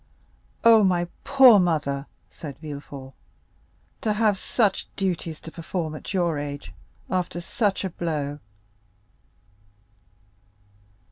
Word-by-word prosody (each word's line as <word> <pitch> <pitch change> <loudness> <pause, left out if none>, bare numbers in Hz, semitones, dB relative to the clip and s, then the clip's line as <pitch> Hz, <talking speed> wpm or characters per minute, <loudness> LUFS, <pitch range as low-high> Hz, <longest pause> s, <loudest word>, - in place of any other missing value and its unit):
"Oh! 225 -2 +7
my 175 -2 +2 0.2
poor 260 -6 +7
mother!" 150 -5 0 0.2
said 145 -4 -8
Villefort, 140 -3 -8 0.9
"to 215 - +1
have 210 -2 +2
such 210 -5 +1
duties 175 -4 -2
to 160 - -9
perform 165 -1 -4
at 155 - -7
your 175 -6 +1
age 145 0 -6 0.4
after 180 -2 -1
such 200 +3 -1
a 190 - -3
blow!" 150 -4 -3
175 Hz, 105 wpm, -25 LUFS, 150-195 Hz, 0.9 s, Oh